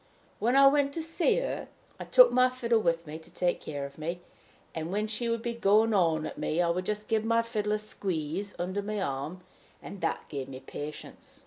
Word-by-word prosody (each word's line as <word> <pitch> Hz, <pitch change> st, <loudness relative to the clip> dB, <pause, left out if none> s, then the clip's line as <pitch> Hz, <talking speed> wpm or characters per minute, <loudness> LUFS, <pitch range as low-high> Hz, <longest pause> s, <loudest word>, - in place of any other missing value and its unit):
When 240 Hz, +4 st, +2 dB
I 275 Hz, 0 st, +8 dB
went 280 Hz, 0 st, +4 dB
to 325 Hz, -, -3 dB
see 330 Hz, +2 st, +2 dB
her, -, -, -2 dB, 0.3 s
I -, -, -5 dB
took -, -, +7 dB
my 255 Hz, 0 st, +4 dB
fiddle 240 Hz, -3 st, +1 dB
with 170 Hz, -4 st, 0 dB
me 155 Hz, +1 st, -7 dB
to 160 Hz, +1 st, -13 dB
take 175 Hz, -1 st, 0 dB
care 145 Hz, -2 st, -4 dB
of 140 Hz, +2 st, -11 dB
me; 170 Hz, +3 st, -4 dB, 0.5 s
and, 160 Hz, +1 st, -4 dB
when 210 Hz, +2 st, 0 dB
she 220 Hz, +2 st, -2 dB
would 230 Hz, 0 st, -1 dB
be 235 Hz, -, -2 dB
going 220 Hz, 0 st, +3 dB
on 165 Hz, -5 st, +2 dB
at -, -, -6 dB
me, 160 Hz, -, -1 dB
I 175 Hz, -1 st, +3 dB
would 180 Hz, +2 st, -1 dB
just 210 Hz, 0 st, -2 dB
give 220 Hz, -1 st, +1 dB
my 230 Hz, +1 st, +2 dB
fiddle 210 Hz, -2 st, -1 dB
a -, -, +2 dB
squeeze 195 Hz, -2 st, -3 dB
under 185 Hz, +3 st, -2 dB
my 210 Hz, +1 st, -3 dB
arm, 150 Hz, +2 st, -3 dB, 0.4 s
and 200 Hz, -, -9 dB
that -, -, -2 dB
gave 135 Hz, -3 st, -5 dB
me 130 Hz, -1 st, -7 dB
patience." 145 Hz, +3 st, -9 dB
200 Hz, 220 wpm, -29 LUFS, 165-230 Hz, 0.5 s, I